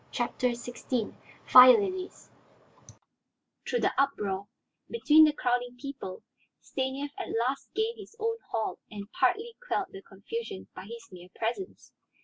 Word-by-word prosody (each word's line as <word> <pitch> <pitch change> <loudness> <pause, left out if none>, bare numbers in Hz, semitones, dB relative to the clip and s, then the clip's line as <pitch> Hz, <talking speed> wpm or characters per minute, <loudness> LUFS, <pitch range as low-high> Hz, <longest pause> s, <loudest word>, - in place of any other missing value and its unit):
CHAPTER 245 0 0
XVI 240 -1 -3 0.3
FIRE 255 +7 +10
LILIES 375 -2 -4 1.4
Through 485 - +1
the - - +2
uproar, 205 -8 -1 0.4
between 315 -9 +6
the 305 - +4
crowding 245 -3 -1
people, 270 -9 -7 0.4
Stanief 270 +2 -3
at - - -4 0.2
last 275 +1 -4
gained 445 +2 -1
his 415 +2 -11
own 455 0 -1
hall 220 -1 -2
and 205 +1 -8
partly 445 - +1
quelled 390 -5 0
the 195 - -9
confusion 195 - -7
by - - -9
his 230 +2 -9
mere 180 0 -12
presence. 240 - -4
255 Hz, 130 wpm, -29 LUFS, 225-365 Hz, 1.4 s, FIRE